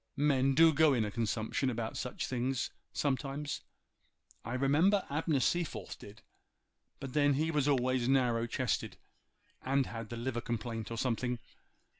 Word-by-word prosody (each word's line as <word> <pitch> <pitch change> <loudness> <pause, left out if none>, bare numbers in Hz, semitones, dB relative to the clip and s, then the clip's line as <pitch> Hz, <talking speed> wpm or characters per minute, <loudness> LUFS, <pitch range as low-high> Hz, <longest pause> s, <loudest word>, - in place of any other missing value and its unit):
Men 135 -2 +3
do 165 +2 +7
go 150 -1 +5
in 115 -3 +1
a 105 - -4
consumption 115 +3 -1
about 115 -2 -3
such 125 - -3
things 130 +1 -1 0.2
sometimes. 140 +1 -2 0.8
I 120 +3 -4
remember 155 +10 +3
Abner 150 -1 +1
Seaforth 140 - -1
did—but 110 +4 -14
then 145 -1 +4
he 160 +3 +1
was 150 -3 +1
always 130 -3 +2
narrow 120 -3 +2
chested, 120 -2 -2 0.6
and 135 +1 +1
had 115 -2 -7
the 120 - -5
liver 120 0 -2
complaint, 115 -2 -4
or 115 - -5
something. 125 0 -1
130 Hz, 140 wpm, -32 LUFS, 120-145 Hz, 0.8 s, do